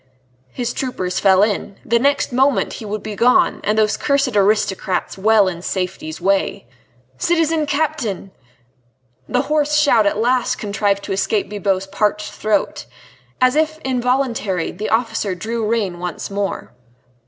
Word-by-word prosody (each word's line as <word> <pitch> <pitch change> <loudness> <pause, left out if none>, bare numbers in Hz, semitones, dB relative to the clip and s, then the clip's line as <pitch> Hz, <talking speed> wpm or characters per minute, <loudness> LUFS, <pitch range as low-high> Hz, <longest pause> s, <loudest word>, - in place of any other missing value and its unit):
His 240 - -3
troopers 185 -9 -3
fell 190 0 +5
in. 205 -2 -1
The 235 +1 +2
next 280 0 +1
moment 265 +2 +2
he 220 - -8
would 210 0 -4
be 215 -1 -5
gone, 245 +5 +3
and 210 +1 0
those 215 0 +2
cursed 280 -4 +1
aristocrats 200 -2 +1
well 210 0 +4
in 170 -2 -4
safety's 180 -4 -4
way. 195 -5 0 0.5
"Citizen 325 -2 +1
Captain!" 260 - -2 1.0
The 250 - +1
hoarse 300 0 +1
shout 240 -8 +4
at 200 - 0
last 245 +3 +1
contrived 200 -1 -1
to 200 - -6
escape 200 +1 0
Bibot's 195 -2 -1
parched 210 +1 -1
throat. 215 0 -1 0.5
As 255 +1 +3
if 315 0 +1
involuntarily, 250 -8 0
the 210 +4 -5
officer 220 -4 0
drew 225 +3 -3
rein 200 -7 -1
once 180 +2 -5
more. 200 0 -3
215 Hz, 140 wpm, -19 LUFS, 195-255 Hz, 1.0 s, fell